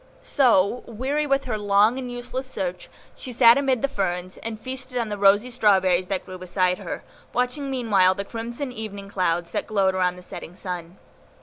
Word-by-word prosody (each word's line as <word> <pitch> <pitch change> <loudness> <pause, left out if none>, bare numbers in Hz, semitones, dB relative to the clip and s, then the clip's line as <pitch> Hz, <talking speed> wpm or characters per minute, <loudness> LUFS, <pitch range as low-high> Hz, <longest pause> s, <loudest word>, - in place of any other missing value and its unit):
So, 245 -4 +3
weary 270 +6 -1
with 275 0 +2
her 220 -4 -2
long 205 +4 +3
and 250 -2 -5
useless 250 +2 -5
search, 180 -7 -4 0.3
she 255 - -7
sat 235 -1 +7
amid 265 -3 +1
the - - +4
ferns, 185 -7 -3
and 225 -1 -6
feasted 255 +1 -5
on 230 -3 -1
the 205 - -3
rosy 205 +5 +4
strawberries 190 -6 +3
that 190 -1 -2
grew 185 0 -9
beside 185 0 0
her, - - -6 0.3
watching 250 +3 -1
meanwhile 205 -8 +3
the 200 - -4
crimson 235 +5 -5
evening 205 -4 -7
clouds 175 -3 0
that - - -2
glowed 195 -3 +2
around 180 -1 +1
the 180 - -12
setting 175 0 -9
sun. 180 -1 -6
210 Hz, 185 wpm, -24 LUFS, 185-250 Hz, 0.3 s, sat